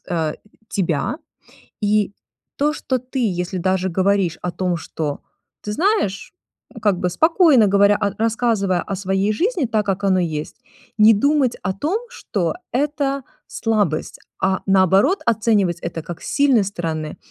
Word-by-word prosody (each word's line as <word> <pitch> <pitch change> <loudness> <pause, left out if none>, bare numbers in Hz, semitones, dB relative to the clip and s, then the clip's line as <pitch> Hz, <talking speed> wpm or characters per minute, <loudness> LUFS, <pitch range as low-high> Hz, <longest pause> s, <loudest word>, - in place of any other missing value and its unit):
э, 160 -3 -1 0.3
тебя. 170 - -1 0.6
И 210 -1 +1 0.4
то, 295 +2 +1
что 260 -4 -2
ты, 255 +2 -7
если 180 -5 -1
даже 185 +1 0
говоришь 190 -2 +1
о 180 - -2
том, 175 0 -1
что 155 -3 -4 0.4
ты 210 - -4
знаешь, 325 - 0 0.5
как 205 -4 +2
бы 180 - 0
спокойно 315 - +4
говоря 200 +1 +4 0.2
рассказывая 220 -5 +1
о 195 - -4
своей 195 +2 0
жизни 345 - 0
так, 220 -2 0
как 195 0 -1
оно 190 -1 +3
есть, 155 -3 -4 0.4
не 215 +1 +8
думать 275 +2 +2
о 185 - -1
том, 310 - -1
что 185 - -3 0.2
это 280 0 -1 0.2
слабость, 205 -9 -1 0.2
а 190 0 +1
наоборот 195 - +3
оценивать 210 -6 +2
это 165 - -5
как 170 +1 -8
с - - -8
сильной 275 -7 +3
стороны. 165 -5 -4
200 Hz, 140 wpm, -20 LUFS, 180-240 Hz, 0.6 s, не